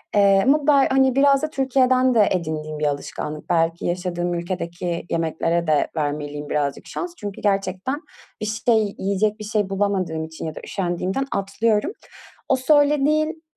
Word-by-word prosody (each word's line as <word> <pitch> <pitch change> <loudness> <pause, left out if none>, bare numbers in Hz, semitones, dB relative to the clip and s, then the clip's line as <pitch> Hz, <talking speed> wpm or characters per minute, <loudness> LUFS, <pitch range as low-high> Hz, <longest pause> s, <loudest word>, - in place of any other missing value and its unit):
Eee, 200 -1 +5
ama 285 +2 +3
be 280 -2 +5
hani, 265 -1 +3
biraz 275 0 +4
da 310 - 0
Türkiye'den 260 -2 +2
de 210 -3 +5
edindiğim 155 -3 -3
bir 150 - 0
alışkanlık. 150 +1 -4
Belki 165 0 +1
yaşadığım 175 0 -2
ülkedeki 170 -1 -4
yemeklere 165 +1 0
de 150 -2 +2
vermeliyim 145 -1 -3
birazcık 145 -2 -2
şans 355 -1 -5
çünkü 205 -1 -7
gerçekten 195 +7 -1 0.4
bir - - -1
şey, 220 -1 +1
yiyecek 205 +2 0
bir - - -6
şey 210 -2 -1
bulamadığım 190 -5 -1
için 160 0 -7
ya 155 -1 -5
da - - -6
üşendiğimden 190 +6 -2
atlıyorum. 210 - 0 0.6
O 265 - +5
söylediğin, 300 +3 +2
195 Hz, 150 wpm, -22 LUFS, 170-260 Hz, 0.6 s, Eee